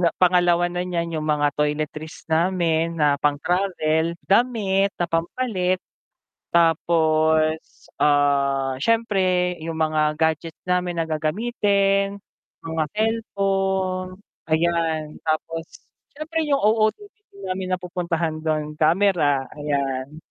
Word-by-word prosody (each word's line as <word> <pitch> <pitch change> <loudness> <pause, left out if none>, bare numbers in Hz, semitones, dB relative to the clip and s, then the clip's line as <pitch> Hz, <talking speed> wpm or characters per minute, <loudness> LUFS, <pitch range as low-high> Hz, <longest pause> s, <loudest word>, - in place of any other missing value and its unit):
na 175 - +4
pangalawa 175 -1 +3
na 175 - -2
niyan 170 -2 -2
yung 155 - -4
mga 145 -1 +2
toiletries 150 +2 -3
namin 165 -1 +1
na 145 -2 +3
pang-travel 160 +1 0
damit 200 -3 +2
na 175 - 0
pampalit 180 +2 -1 0.7
tapos, 160 -1 +2 0.4
ah, 140 -2 +2
siyempre 190 -3 +1
yung 160 0 -5
mga 155 -1 +1
gadgets 160 +1 -1
namin 180 -1 0
na 165 - 0
gagamitin, 200 +4 0 0.5
mga 160 -1 -1
cellphone, 195 -4 -1 0.3
ayan, 160 -1 0
tapos 165 +1 -2 0.5
siyempre 315 0 -2
yung 280 - +3
OOTD 220 - -1
namin 185 0 -3
napupuntahan 170 -3 -3
dun 155 -1 -2
kamera, 160 -5 +3
ayan. 140 -1 -3
170 Hz, 100 wpm, -23 LUFS, 155-190 Hz, 0.7 s, na